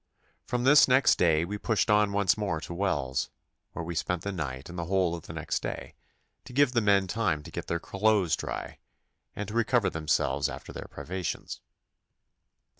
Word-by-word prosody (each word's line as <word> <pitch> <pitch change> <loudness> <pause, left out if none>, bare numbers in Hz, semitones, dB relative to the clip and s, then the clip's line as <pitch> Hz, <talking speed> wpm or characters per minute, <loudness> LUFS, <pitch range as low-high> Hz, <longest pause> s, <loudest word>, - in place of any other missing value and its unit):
From 125 0 -1
this 145 +3 +7
next 130 +1 +5
day 80 -2 +3
we 105 +3 -5
pushed 110 0 +1
on 105 -1 +4
once 100 -2 +3
more 100 -7 -2
to 85 - -6
Wells, 70 -9 -1 0.4
where 85 - -5
we 85 - -4
spent 85 +1 -2
the 100 - -2
night 70 -7 -5
and 90 - -9
the 85 -1 -3
whole 90 -1 +1
of 85 -2 -7
the - - -7
next - - -2
day, - - -5 0.5
to - - -11
give 140 0 +4
the 120 -2 +2
men 100 -2 +4
time 90 -6 -1
to - - -11
get - - -6
their 85 - -1
clothes 100 -1 +2
dry, - - -6 0.6
and 105 - -4
to 105 - -7
recover 115 -3 +2
themselves 80 -1 0
after - - -8
their - - -7
privations. 95 0 -5
95 Hz, 190 wpm, -28 LUFS, 85-110 Hz, 0.6 s, this